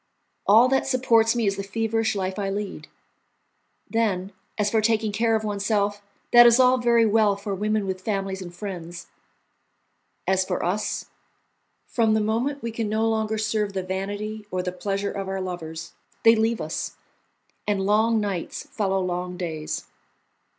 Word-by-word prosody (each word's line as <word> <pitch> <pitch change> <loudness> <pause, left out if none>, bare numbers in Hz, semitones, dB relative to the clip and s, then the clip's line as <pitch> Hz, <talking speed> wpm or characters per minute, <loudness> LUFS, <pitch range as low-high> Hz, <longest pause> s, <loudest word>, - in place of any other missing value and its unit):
All 225 +5 +7
that 265 0 +1
supports 240 -3 +3
me 235 -2 +1
is 195 -1 0
the 200 - -3
feverish 225 +1 -1
life 190 0 -2
I 195 -1 -1
lead. 200 0 -4 1.0
Then, 200 -4 0 0.3
as 210 -1 +1
for 220 - +3
taking 220 -1 +1
care 225 +2 +2
of 220 - -1
oneself, 205 0 0 0.3
that 240 0 +10
is 235 +1 +5
all 255 0 +5
very 235 -1 +4
well 215 -1 +3
for 200 0 -5
women 210 +1 0
with 190 -1 -3
families 195 -2 -2
and 175 -2 -7
friends; 175 -2 -7 1.2
as 190 0 +2
for 185 -2 -2
us, 200 +5 -1 0.8
from 225 -2 +2
the - - +3
moment 230 +7 -1
we 230 - -2
can 225 -1 -3
no 220 +1 +1
longer 220 -1 0
serve 215 -2 -1
the 190 -1 -2
vanity 205 +3 -4
or 185 -1 -2
the 180 - -2
pleasure 200 +2 -2
of 195 -1 -4
our 195 0 -2
lovers, 165 -3 -6 0.3
they 225 0 +7
leave 225 -1 +1
us, 155 0 -4 0.7
and 200 -2 0
long 220 +2 +3
nights 200 -5 -3
follow 195 -7 0
long 180 0 -3
days. 160 -4 -4
210 Hz, 165 wpm, -24 LUFS, 190-225 Hz, 1.2 s, that